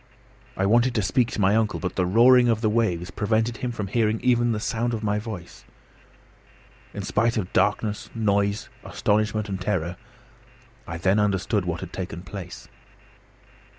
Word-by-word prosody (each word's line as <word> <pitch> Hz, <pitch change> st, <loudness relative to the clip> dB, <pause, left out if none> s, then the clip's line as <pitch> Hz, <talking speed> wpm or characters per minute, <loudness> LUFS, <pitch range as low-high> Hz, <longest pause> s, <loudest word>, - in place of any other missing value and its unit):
I 95 Hz, -, +1 dB
wanted 120 Hz, +4 st, +3 dB
to 105 Hz, -, +1 dB
speak 115 Hz, +5 st, +1 dB
to -, -, -4 dB
my 100 Hz, +1 st, +3 dB
uncle, 110 Hz, -2 st, +1 dB
but 90 Hz, -, -4 dB
the 90 Hz, -1 st, +1 dB
roaring 120 Hz, +5 st, +6 dB
of 110 Hz, -1 st, +1 dB
the 110 Hz, -2 st, +1 dB
waves 90 Hz, -6 st, 0 dB
prevented 110 Hz, +4 st, 0 dB
him 125 Hz, -, -3 dB
from 110 Hz, -4 st, -4 dB
hearing 110 Hz, +2 st, 0 dB
even 120 Hz, -1 st, +3 dB
the 110 Hz, -, -1 dB
sound 115 Hz, +2 st, -1 dB
of 110 Hz, -, -6 dB
my 105 Hz, 0 st, 0 dB
voice. 105 Hz, -6 st, -8 dB, 1.3 s
In 100 Hz, -, -6 dB
spite 115 Hz, +4 st, +1 dB
of 95 Hz, -4 st, -3 dB
darkness, 105 Hz, 0 st, 0 dB
noise, 100 Hz, -2 st, 0 dB, 0.2 s
astonishment, 105 Hz, 0 st, 0 dB
and 95 Hz, -2 st, -4 dB
terror, 90 Hz, -3 st, -2 dB, 0.9 s
I 85 Hz, -, -5 dB
then 95 Hz, +4 st, +2 dB
understood 100 Hz, -1 st, 0 dB
what 85 Hz, -1 st, -3 dB
had -, -, -8 dB
taken 90 Hz, -2 st, -6 dB
place. 90 Hz, -1 st, -9 dB
105 Hz, 165 wpm, -24 LUFS, 95-115 Hz, 1.3 s, roaring